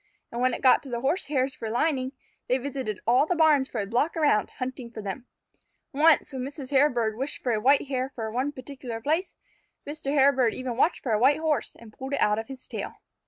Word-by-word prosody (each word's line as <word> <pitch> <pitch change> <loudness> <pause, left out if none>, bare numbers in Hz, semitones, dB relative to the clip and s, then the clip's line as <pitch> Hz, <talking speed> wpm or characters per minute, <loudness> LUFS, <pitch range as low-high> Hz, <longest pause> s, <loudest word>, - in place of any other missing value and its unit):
And 235 - -4
when 255 -1 +2
it - - -9
got 260 - +6
to 275 - -11
the 235 -1 -3
Horsehairs 275 -2 0
for 225 - -6
lining, 260 +2 0 0.3
they 255 - +2
visited 260 -6 -4
all 250 +6 +4
the 360 - +1
barns 305 -5 +4
for 230 - -4
a 200 - -1
block 245 +11 0
around, 290 -9 +2
hunting 255 -2 -6
for 230 - -9
them. 215 +5 -6 0.7
Once, 300 0 +4
when 260 - -4
Mrs. 275 0 -7
Hairbird 245 -6 +2
wished 270 +5 -4
for 245 - +1
a 215 - +1
white 275 +5 +4
hair 260 -1 -2
for 220 -2 -4
one 255 +5 -1
particular 255 -4 -7
place, 315 - -1 0.5
Mr. 290 -1 -4
Hairbird 270 -4 +3
even 255 -2 -4
watched 310 +7 +1
for 245 - -2
a 215 - +2
white 270 +5 +4
Horse, 315 -2 -1
and 225 -2 -15
pulled 265 +4 -7
it 280 - 0
out 210 +1 +2
of 225 - -6
his 265 -1 -10
tail. - - -5
260 Hz, 220 wpm, -26 LUFS, 235-285 Hz, 0.7 s, got